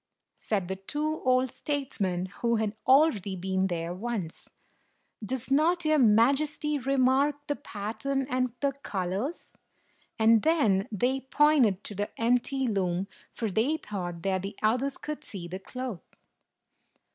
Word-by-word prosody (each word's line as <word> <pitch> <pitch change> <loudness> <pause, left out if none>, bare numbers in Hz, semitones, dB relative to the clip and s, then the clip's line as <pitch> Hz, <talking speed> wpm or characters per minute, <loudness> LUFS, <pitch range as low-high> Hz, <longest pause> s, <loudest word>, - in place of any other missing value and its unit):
said 195 -5 -2
the 190 +1 -3
two 300 +10 -3
old 255 0 +3
statesmen 210 -11 -2 0.2
who 235 -1 +2
had 220 -1 -1
already 260 - +4
been 190 +1 0
there 170 -1 -3
once. 195 -4 -5 0.7
"Does 260 +4 -4
not 330 +4 +3
your 310 -1 +4
Majesty 275 +6 +3
remark 270 +2 +2
the 290 - -1
pattern 230 +7 -3
and 255 -2 0
the 280 -1 +2
colors?" 210 - -4 0.6
And 225 0 +5
then 220 - +2
they 250 +6 +1
pointed 270 -11 +4
to - - -5
the 205 +1 -3
empty 250 +3 +1
loom, 190 -3 -1 0.2
for 225 -3 -3
they 250 +11 +1
thought 175 - -6
that 190 -1 0
the 195 +2 -6
others 255 +6 +1
could 300 0 -6
see 180 -4 -7
the 185 +2 -6
cloth. 250 -2 -6
230 Hz, 135 wpm, -28 LUFS, 195-275 Hz, 0.7 s, And